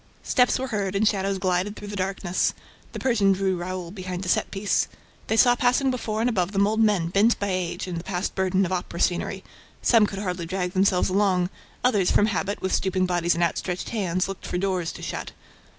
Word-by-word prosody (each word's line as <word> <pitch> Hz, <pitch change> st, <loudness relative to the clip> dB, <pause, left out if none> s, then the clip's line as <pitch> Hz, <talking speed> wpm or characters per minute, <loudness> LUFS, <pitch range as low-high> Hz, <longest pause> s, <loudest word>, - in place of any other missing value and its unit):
Steps 250 Hz, -1 st, +3 dB
were 260 Hz, 0 st, -4 dB
heard 200 Hz, -3 st, -2 dB
and 210 Hz, +2 st, +3 dB
shadows 195 Hz, -2 st, 0 dB
glided 185 Hz, +2 st, 0 dB
through 205 Hz, -, -8 dB
the 205 Hz, -, -5 dB
darkness. 185 Hz, -1 st, -1 dB, 0.4 s
The -, -, -6 dB
Persian 210 Hz, -6 st, +3 dB
drew 190 Hz, 0 st, 0 dB
Raoul 180 Hz, 0 st, -5 dB
behind 185 Hz, -1 st, -5 dB
a -, -, -3 dB
set -, -, +1 dB
piece. 200 Hz, 0 st, 0 dB, 0.4 s
They 220 Hz, -, 0 dB
saw 245 Hz, +1 st, +6 dB
passing 250 Hz, +2 st, +2 dB
before 225 Hz, -3 st, -2 dB
and 235 Hz, -, +2 dB
above 195 Hz, -5 st, 0 dB
them 200 Hz, 0 st, +3 dB
old 215 Hz, +2 st, 0 dB
men 205 Hz, -7 st, +3 dB
bent 205 Hz, +6 st, +3 dB
by 200 Hz, -, -2 dB
age 185 Hz, -2 st, -2 dB
and 175 Hz, -2 st, -4 dB
the -, -, -8 dB
past 185 Hz, 0 st, -3 dB
burden 190 Hz, 0 st, +1 dB
of 180 Hz, -, -4 dB
opera 175 Hz, -2 st, -3 dB
scenery. 175 Hz, -1 st, 0 dB, 0.4 s
Some 225 Hz, -3 st, +5 dB
could 195 Hz, -, -7 dB
hardly 180 Hz, -4 st, -3 dB
drag 180 Hz, 0 st, -2 dB
themselves 190 Hz, -1 st, +2 dB
along; 185 Hz, -2 st, +2 dB, 0.3 s
others, 210 Hz, -7 st, +3 dB
from 205 Hz, -, +4 dB
habit, 200 Hz, -1 st, -2 dB
with 190 Hz, -, -1 dB
stooping 185 Hz, -1 st, +1 dB
bodies 175 Hz, -1 st, +1 dB
and 170 Hz, -, +1 dB
outstretched 175 Hz, +1 st, -2 dB
hands, 185 Hz, -5 st, -1 dB
looked 195 Hz, -1 st, -7 dB
for -, -, -2 dB
doors 185 Hz, -3 st, -1 dB
to -, -, -10 dB
shut. -, -, -5 dB
190 Hz, 215 wpm, -25 LUFS, 180-205 Hz, 0.4 s, saw